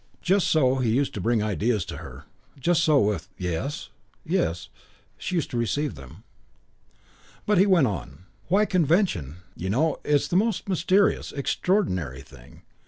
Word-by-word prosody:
Just 195 +1 +2
so 135 -4 +3
he 125 -3 0
used 135 +3 0
to 100 - -4
bring 115 +2 +1
ideas 105 -1 0
to - - -7
her; - - -10 0.3
just 170 +4 +2
so, 155 -3 +4
with 100 - -1
"Yes 90 - -4 0.4
yes," 85 +1 -1 0.5
she 185 - -4
used 165 - -1
to 120 - -2
receive 145 +4 -1
them. 75 - -13 1.2
But 210 -3 +3
he 195 - +5
went 180 -7 +5
on. 95 -4 -5 0.2
"Why, 200 +4 +3
convention, 160 - 0
you 95 - -4
know, 150 +9 +1
it's 145 -1 +2
the - - -3
most 210 +1 +1
mysterious, 190 +2 +2
extraordinary 95 - -1
thing. 65 -3 -17
130 Hz, 155 wpm, -25 LUFS, -, 1.2 s, he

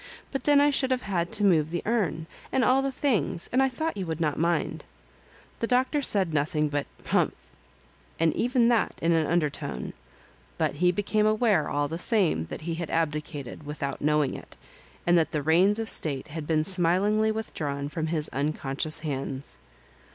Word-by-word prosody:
" - - -25
But 270 - -4
then 290 -1 +5
I 290 0 +4
should 270 -2 +1
have 255 -1 0
had 175 -3 -1
to 215 -2 +2
move 160 -6 +4
the 170 +1 -3
urn, 200 -8 0 0.3
and 260 - +2
all 260 +1 +4
the 275 0 -1
things, 250 - +1
and 260 - +4
I 265 - +3
thought 315 +6 -3
you 190 -3 -4
would 160 -1 -3
not 150 -3 0
mind." 170 +1 0 0.8
The 230 - -1
Doctor 260 +4 +2
said 190 - +1
nothing 150 +1 +1
but 145 0 -2
'' - - -23
Humph - - +1 0.8
I - - +1
and 165 - +3
even 245 0 +2
that 235 -2 +1
in 165 - +1
an 160 -2 +2
undertone; 150 - -2 0.6
but 145 - -1
he 180 +2 +3
became 210 +3 +1
aware 215 -6 +2
all 145 0 0
the 165 +3 -5
same 180 - +1
that - - -7
he 165 +1 -3
had 165 0 -4
abdicated, 150 -4 -3
without 140 -2 -4
knowing 150 -2 +2
it, - - -10 0.5
and 175 0 +5
that 160 - +1
the 150 -2 -2
reins 180 +7 +4
of 225 -1 -2
state 140 -10 +1
had 155 0 -6
been 155 -1 +2
smilingly 195 +5 +2
with 220 0 -5
drawn 140 -3 -3
from 155 +2 -3
his 155 -2 0
unconscious 145 +1 -2
hands. 140 -2 -4
170 Hz, 195 wpm, -27 LUFS, 150-215 Hz, 0.8 s, then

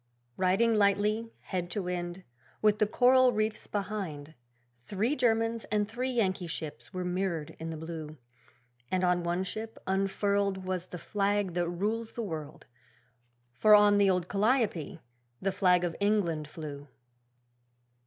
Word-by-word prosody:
Riding 190 +5 +3
lightly, 210 +2 +2
head 180 -2 -3
to 195 +2 -2
wind, 175 0 -4 0.4
With 210 0 +3
the 210 - +3
coral 255 +3 +5
reefs 215 0 -1
behind, 190 -8 -4 0.5
Three 210 - -1
Germans 225 -3 +1
and 210 -1 0
three 245 +4 -3
Yankee 190 -7 0
ships 160 -2 -6
were 185 -2 -4
mirrored 180 -4 -2
in 165 0 -5
the 160 - -5
blue; 160 -1 -7 0.7
And 185 0 0
on 180 -1 +3
one 175 +2 -1
ship 220 +4 -6
unfurled 195 0 0
Was 185 -1 -3
the 180 - -7
flag 200 0 0
that 175 -1 0
rules 215 +6 -2
the 235 - -3
world 155 -6 -6 0.9
For 210 +12 +6
on 205 0 +6
the 200 -1 +5
old 180 -2 +1
'Calliope' 210 - +1 0.4
the 195 - 0
flag 180 -2 +3
of 170 -2 -1
England 190 -7 +1
flew. 145 -2 -8
195 Hz, 145 wpm, -30 LUFS, 175-215 Hz, 0.9 s, For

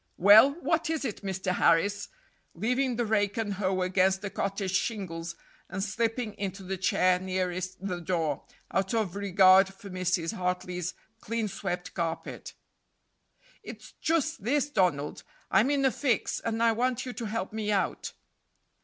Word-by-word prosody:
"Well, 215 +9 +8
what 325 -1 0
is 320 -3 -1
it, 215 - -4
Mr. 190 -2 -2
Harris?" 185 +4 +2 0.5
leaving 250 +6 0
rake 210 -3 +1
and 215 -3 -1
hoe 185 -1 0
against 190 +1 +2
the 200 - -4
cottage 195 -1 -2
shingles 170 -7 -3 0.3
and 190 +1 -3
slipping 225 +2 -1
into 195 0 -4
the 190 +1 -3
chair 185 0 +2
nearest 185 0 -3
the 180 -3 -2
door, 165 -4 -1 0.3
out 190 +3 0
of 210 -6 -1
regard 195 -1 +5
for 200 0 -12
Mrs. 185 -1 -1
Hartley's 180 -2 -3 0.2
clean 225 0 -2
swept 180 -2 -4
carpet. 165 -2 -4 1.1
"It's - - -10
just 320 -6 0
this, 290 +5 +1
Donald. 165 - 0 0.3
I'm 210 +7 +4
in 280 -1 +2
a 265 - +4
fix, 255 -4 0
and 230 0 -1
I 230 - +5
want 245 +2 0
you 250 - -5
to 240 - -5
help 210 -2 -3
me 215 -1 -2
out." 200 -2 -1
195 Hz, 150 wpm, -28 LUFS, 185-225 Hz, 1.1 s, Well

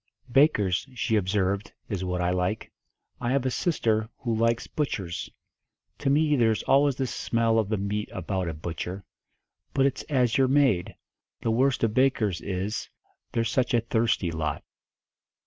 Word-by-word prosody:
"Bakers," 120 - +3
she 115 -2 0
observed, 100 0 0
"is 95 -3 -3
what 90 -1 -2
I 90 0 +1
like. 90 +4 -1 0.5
I 120 - -2
have 135 -1 +1
a 130 - +1
sister 110 -9 0
who 120 -3 -2
likes 115 +1 +1
butchers. 95 - -3 0.7
To - - 0
me 150 +1 +3
there's 115 -4 +2
always 140 0 +4
the 130 - -1
smell 115 -2 +1
of 105 -3 -1
the 110 - 0
meat 100 +2 -2
about 90 0 -2
a 80 - -5
butcher. 85 +4 -5 0.7
But 135 - +4
it's 140 0 0
as 125 -4 +2
you're 135 - +5
made. 130 -10 +2 0.5
The 115 - +1
worst 130 +2 +2
of 110 -2 +2
bakers 115 -9 +2
is, 100 +2 -3 0.4
they're 115 - +1
such 120 +2 +1
a 120 - +3
thirsty 110 -6 0
lot." 80 -3 -3
110 Hz, 160 wpm, -27 LUFS, 95-130 Hz, 0.7 s, you're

